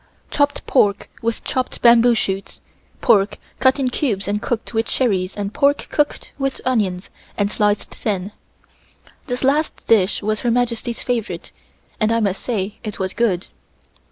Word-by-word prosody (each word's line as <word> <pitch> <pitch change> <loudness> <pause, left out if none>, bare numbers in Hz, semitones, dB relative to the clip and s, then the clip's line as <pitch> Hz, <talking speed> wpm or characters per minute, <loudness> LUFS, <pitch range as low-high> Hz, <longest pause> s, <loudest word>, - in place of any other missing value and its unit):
Chopped 285 -1 +1
pork 205 -6 +2
with 230 0 -2
chopped 255 -1 -2
bamboo 235 0 +7
shoots, 195 -2 -3 0.4
pork 205 -4 +3 0.2
cut 260 +1 +4
in 265 -2 +1
cubes 210 -9 -1
and 205 +1 -1
cooked 235 0 -3
with 225 0 0
cherries 195 -7 0
and 205 0 -3
pork 285 0 +2
cooked 295 -1 0
with 270 -1 -1
onions 200 -7 0 0.3
and 205 0 +1
sliced 210 -1 +1
thin. 200 -2 -3 1.0
This 250 0 -3
last 290 +4 +1
dish 210 -2 +3
was 215 0 0
Her 240 - 0
Majesty's 235 -1 -1
favorite 240 -4 -3 0.5
and 215 0 +2
I 230 - +2
must 200 -3 0
say 210 -4 -3
it 215 -3 -5
was 190 -1 -2
good. 205 -6 +1
225 Hz, 155 wpm, -20 LUFS, 200-245 Hz, 1.0 s, bamboo